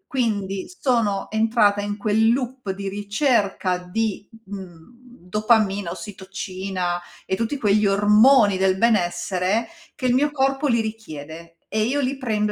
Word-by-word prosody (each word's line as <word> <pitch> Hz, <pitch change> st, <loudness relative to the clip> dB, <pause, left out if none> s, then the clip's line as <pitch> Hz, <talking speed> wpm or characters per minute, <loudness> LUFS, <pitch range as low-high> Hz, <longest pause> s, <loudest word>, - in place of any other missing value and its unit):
quindi 200 Hz, -6 st, -1 dB
sono 230 Hz, -7 st, 0 dB
entrata 220 Hz, -2 st, +2 dB
in 205 Hz, 0 st, -4 dB
quel 220 Hz, +2 st, +2 dB
loop 250 Hz, -2 st, -3 dB
di 195 Hz, +1 st, -6 dB
ricerca 205 Hz, -2 st, 0 dB
di, 205 Hz, +3 st, -3 dB, 0.2 s
mhmm, 190 Hz, +4 st, -11 dB, 0.2 s
dopamina, 210 Hz, -2 st, +1 dB
ossitocina 190 Hz, -2 st, -4 dB, 0.2 s
e -, -, -1 dB
tutti 230 Hz, +7 st, -2 dB
quegli 210 Hz, -3 st, +2 dB
ormoni 210 Hz, +2 st, +5 dB
del 190 Hz, 0 st, +2 dB
benessere, 195 Hz, 0 st, +1 dB, 0.3 s
che 260 Hz, -, -5 dB
il 250 Hz, -, +3 dB
mio 285 Hz, +4 st, +3 dB
corpo 270 Hz, 0 st, 0 dB
li 235 Hz, -3 st, +2 dB
richiede 165 Hz, -7 st, -7 dB
e 215 Hz, -, -1 dB
io 260 Hz, +6 st, 0 dB
li 270 Hz, 0 st, -1 dB
prendo 215 Hz, -5 st, -1 dB
210 Hz, 135 wpm, -22 LUFS, 190-235 Hz, 0.3 s, ormoni